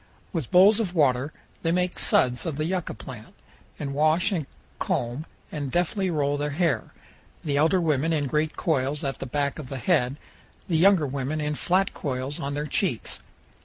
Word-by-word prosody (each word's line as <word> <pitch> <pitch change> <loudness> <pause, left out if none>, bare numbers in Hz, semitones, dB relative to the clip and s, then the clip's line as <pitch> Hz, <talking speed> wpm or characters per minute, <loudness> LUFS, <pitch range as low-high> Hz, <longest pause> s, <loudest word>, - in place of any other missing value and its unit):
With 160 -9 -2
bowls 200 +5 +6
of 190 -5 -2
water 140 -2 +2 0.3
they 165 - +1
make 180 +1 0
suds 125 +5 +3
of 160 - -2
the 155 - 0
yucca 180 0 -2
plant, 120 -5 -10 0.4
and 140 -2 -4
wash 155 +7 +3
and 160 -8 -2 0.3
comb 120 +7 -2 0.2
and 145 -3 -4
deftly 185 +4 0
roll 145 -3 +1
their 145 +1 -1
hair, 160 +1 0 0.5
the 145 -3 -1
elder 160 +5 +4
women 155 -2 +1
in 150 -3 +1
great 150 +3 -1
coils 145 -2 0
at 135 -1 -3
the - - -5
back 140 +2 -1
of 135 -4 -7
the 135 - -4
head, 135 -2 +1 0.5
the 165 - +1
younger 185 -2 +5
women 140 +2 -2
in 150 0 -1
flat 185 +6 +1
coils 135 0 -3
on 140 +1 -3
their 145 +1 -2
cheeks. 150 - 0
150 Hz, 180 wpm, -26 LUFS, 140-170 Hz, 0.5 s, bowls